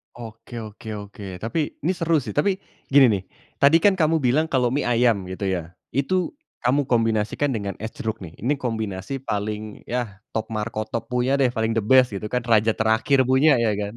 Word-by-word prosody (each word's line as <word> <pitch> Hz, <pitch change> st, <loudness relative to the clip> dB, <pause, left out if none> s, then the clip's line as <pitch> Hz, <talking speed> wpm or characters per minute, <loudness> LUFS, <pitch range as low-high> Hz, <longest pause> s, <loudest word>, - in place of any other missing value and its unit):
Oke 115 Hz, 0 st, -9 dB
oke 110 Hz, 0 st, -9 dB
oke. 100 Hz, -1 st, -8 dB, 0.2 s
Tapi, 145 Hz, +7 st, -2 dB
ini 160 Hz, -, 0 dB
seru 165 Hz, -3 st, +1 dB
sih, 110 Hz, -1 st, -7 dB
tapi 195 Hz, +7 st, +3 dB, 0.3 s
gini 135 Hz, -1 st, +6 dB
nih, 100 Hz, -3 st, 0 dB, 0.3 s
tadi 155 Hz, +4 st, +5 dB
kan 200 Hz, -2 st, +4 dB
kamu 160 Hz, -1 st, +2 dB
bilang 135 Hz, +5 st, +2 dB
kalau 130 Hz, -6 st, +1 dB
mie 140 Hz, +4 st, -1 dB
ayam 115 Hz, -5 st, +2 dB
gitu 95 Hz, +2 st, -3 dB
ya, 85 Hz, -2 st, -3 dB, 0.2 s
itu 160 Hz, +8 st, 0 dB, 0.3 s
kamu 140 Hz, +3 st, +2 dB
kombinasikan 115 Hz, +3 st, +1 dB
dengan 100 Hz, -6 st, -2 dB
es 110 Hz, -, -3 dB
jeruk 110 Hz, -1 st, -4 dB
nih. 85 Hz, -3 st, -10 dB
Ini 125 Hz, +7 st, 0 dB
kombinasi 110 Hz, +2 st, -4 dB
paling, 105 Hz, 0 st, -4 dB
ya, 115 Hz, -5 st, -3 dB
top 110 Hz, 0 st, -4 dB
markotop 110 Hz, +2 st, -3 dB
punya 125 Hz, +2 st, +1 dB
deh, 135 Hz, -2 st, +3 dB
paling 115 Hz, -1 st, -1 dB
the 115 Hz, -, +1 dB
best 125 Hz, +2 st, +4 dB
gitu 105 Hz, +2 st, -4 dB
kan, 125 Hz, +1 st, -2 dB
raja 110 Hz, -1 st, +3 dB
terakhir 110 Hz, +5 st, +3 dB
punya 130 Hz, +3 st, +4 dB
ya 115 Hz, -2 st, +2 dB
kan. 105 Hz, +1 st, -3 dB
115 Hz, 190 wpm, -23 LUFS, 105-135 Hz, 0.3 s, gini